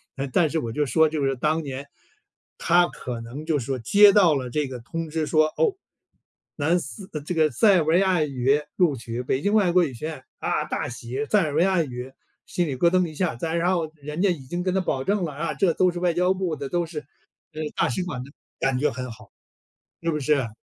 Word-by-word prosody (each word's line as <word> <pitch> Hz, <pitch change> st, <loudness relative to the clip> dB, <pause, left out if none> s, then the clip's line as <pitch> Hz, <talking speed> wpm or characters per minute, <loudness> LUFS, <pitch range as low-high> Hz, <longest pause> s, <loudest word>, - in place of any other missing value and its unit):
那 140 Hz, 0 st, -3 dB
但 155 Hz, +5 st, +2 dB
是 160 Hz, -, 0 dB
我 115 Hz, -6 st, -4 dB
就 150 Hz, +5 st, 0 dB
说 160 Hz, +5 st, +4 dB
就 150 Hz, -2 st, -2 dB
是 135 Hz, 0 st, +1 dB
当 155 Hz, +5 st, 0 dB
年， 140 Hz, 0 st, -6 dB, 0.7 s
他 175 Hz, +1 st, +4 dB
可 120 Hz, -7 st, -6 dB
能 125 Hz, +7 st, -8 dB
就 160 Hz, -2 st, +1 dB
是 120 Hz, -, -5 dB
说 135 Hz, 0 st, -2 dB
接 200 Hz, -, +6 dB
到 180 Hz, -7 st, +5 dB
了 130 Hz, -2 st, -3 dB
这 150 Hz, +3 st, -1 dB
个 130 Hz, -1 st, -7 dB
通 165 Hz, +7 st, -5 dB
知 155 Hz, 0 st, -1 dB
说， 155 Hz, 0 st, +4 dB
哦， 435 Hz, -5 st, +2 dB, 0.8 s
南 165 Hz, +4 st, +2 dB
斯 190 Hz, +2 st, -8 dB
呃， 150 Hz, -, -3 dB
这 155 Hz, +5 st, -4 dB
个 155 Hz, -1 st, +4 dB
塞 195 Hz, -, +5 dB
尔 170 Hz, -, +3 dB
维 160 Hz, +3 st, +3 dB
亚 185 Hz, -4 st, +3 dB
语 140 Hz, 0 st, +1 dB, 0.2 s
录 175 Hz, -6 st, +3 dB
取， 115 Hz, 0 st, -5 dB
北 130 Hz, +1 st, -1 dB
京 205 Hz, +6 st, +1 dB
外 200 Hz, -5 st, +4 dB
国 180 Hz, 0 st, +4 dB
语 145 Hz, -6 st, -2 dB
学 120 Hz, -, -7 dB
院， 155 Hz, -5 st, -7 dB, 0.2 s
啊， -, -, -1 dB
大 -, -, -3 dB
喜。 125 Hz, +4 st, -4 dB
塞 210 Hz, +7 st, +3 dB
尔 150 Hz, -3 st, -2 dB
维 160 Hz, -, +4 dB
亚 185 Hz, -2 st, +3 dB
语 125 Hz, -2 st, -7 dB, 0.3 s
心 175 Hz, -2 st, -1 dB
里 135 Hz, -, -2 dB
咯 170 Hz, +7 st, +4 dB
噔 185 Hz, +1 st, +2 dB
一 155 Hz, -, -9 dB
下。 180 Hz, -3 st, -1 dB
再 160 Hz, +7 st, -3 dB
然 175 Hz, +2 st, +2 dB
后 165 Hz, -4 st, -1 dB
人 150 Hz, +2 st, -5 dB
家 200 Hz, -, +4 dB
已 175 Hz, -4 st, -1 dB
经 175 Hz, +6 st, -3 dB
跟 185 Hz, 0 st, 0 dB
他 190 Hz, -, +2 dB
保 135 Hz, -7 st, -1 dB
证 200 Hz, +4 st, 0 dB
了 155 Hz, -, -4 dB
啊， 155 Hz, +4 st, -3 dB
这 185 Hz, -4 st, +2 dB
都 185 Hz, +2 st, +3 dB
是 175 Hz, -, -5 dB
外 175 Hz, -1 st, +1 dB
交 180 Hz, +2 st, +2 dB
部 185 Hz, -4 st, -2 dB
的， 140 Hz, -1 st, -5 dB
都 175 Hz, +2 st, 0 dB
是， 160 Hz, -2 st, -6 dB, 0.5 s
呃， 155 Hz, -, -5 dB
大 -, -, +2 dB
使 185 Hz, -, -1 dB
馆 145 Hz, -9 st, -5 dB
的， 140 Hz, -, -13 dB, 0.3 s
感 135 Hz, -1 st, +1 dB
觉 150 Hz, -, +2 dB
很 125 Hz, +1 st, -5 dB
好， 110 Hz, -, -14 dB, 0.7 s
是 165 Hz, -, 0 dB
不 150 Hz, -, -1 dB
是？ 140 Hz, -4 st, +1 dB
155 Hz, 265 characters per minute, -24 LUFS, 135-175 Hz, 0.8 s, 接